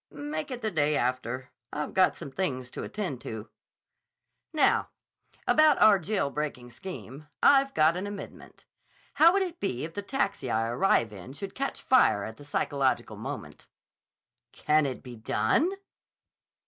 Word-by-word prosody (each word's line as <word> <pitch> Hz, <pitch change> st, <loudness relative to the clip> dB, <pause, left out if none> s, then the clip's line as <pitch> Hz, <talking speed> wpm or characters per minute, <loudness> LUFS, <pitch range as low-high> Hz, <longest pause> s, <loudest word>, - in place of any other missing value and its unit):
"Make 150 Hz, +2 st, -5 dB
it 250 Hz, -2 st, -5 dB
the 215 Hz, -, -1 dB
day 150 Hz, -3 st, +2 dB
after. 130 Hz, +1 st, -2 dB, 0.2 s
I've 150 Hz, 0 st, -4 dB
got 185 Hz, -1 st, +4 dB
some 140 Hz, -, -8 dB
things 130 Hz, -8 st, -2 dB
to -, -, -6 dB
attend 180 Hz, -, -4 dB
to." 110 Hz, -1 st, -7 dB, 1.0 s
"Now, 310 Hz, -2 st, +3 dB, 0.6 s
about 310 Hz, -2 st, +5 dB
our 210 Hz, -2 st, +7 dB
jail 180 Hz, -5 st, -1 dB
breaking 140 Hz, -5 st, -4 dB
scheme? 150 Hz, -1 st, -9 dB, 0.2 s
I've 275 Hz, -1 st, +5 dB
got 155 Hz, +2 st, +4 dB
an 185 Hz, +3 st, -3 dB
amendment. 205 Hz, -1 st, -9 dB, 0.6 s
How 330 Hz, +2 st, +9 dB
would 390 Hz, +1 st, +2 dB
it 350 Hz, -2 st, -6 dB
be 130 Hz, -12 st, -2 dB
if 165 Hz, +1 st, -5 dB
the 205 Hz, -, -3 dB
taxi 200 Hz, -, -2 dB
I 115 Hz, 0 st, 0 dB
arrive 120 Hz, -, +2 dB
in 105 Hz, +7 st, -10 dB
should 195 Hz, +6 st, -7 dB
catch 275 Hz, +1 st, -3 dB
fire 250 Hz, -, +4 dB
at 110 Hz, +2 st, -7 dB
the 145 Hz, -, -12 dB
psychological 140 Hz, -2 st, 0 dB
moment?" -, -, -7 dB, 0.8 s
"Can 155 Hz, -1 st, +2 dB
it 130 Hz, -, -6 dB
be 125 Hz, -2 st, -9 dB
done?" 110 Hz, -, +1 dB
150 Hz, 155 wpm, -28 LUFS, 125-205 Hz, 1.0 s, How